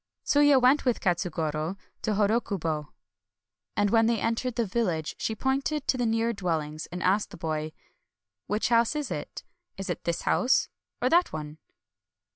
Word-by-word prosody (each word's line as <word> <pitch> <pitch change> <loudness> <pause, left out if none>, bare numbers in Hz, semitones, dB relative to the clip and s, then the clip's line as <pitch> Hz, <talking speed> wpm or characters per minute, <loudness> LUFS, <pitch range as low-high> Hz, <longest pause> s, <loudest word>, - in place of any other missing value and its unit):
Tsuya 290 -2 +5
went 255 +4 +4
with 250 -3 +1
Katsugoro 165 -1 -1 0.2
to 215 - 0
Hodokubo; 200 -8 0 0.9
and 205 -1 +2
when 225 -1 +4
they 230 -2 +1
entered 230 +2 -1
the 235 - +1
village 185 -7 -1
she 220 - -1
pointed 270 +5 -1
to - - +3
the 245 -2 0
nearer 225 +1 +1
dwellings, 160 -6 -3
and 180 0 -6
asked 200 +3 +2
the - - -11
boy, 155 -1 -3 0.4
" 95 +2 -62
Which 210 +3 0
house 235 +3 +3
is 300 -2 -3
it? - - -5 0.2
— 355 - -53
is 195 - -3
it - - -5
this 170 -1 -1
house 255 - +2 0.3
or 255 - +4
that 345 +3 +4
one 155 0 -6
210 Hz, 170 wpm, -27 LUFS, 165-245 Hz, 0.9 s, Tsuya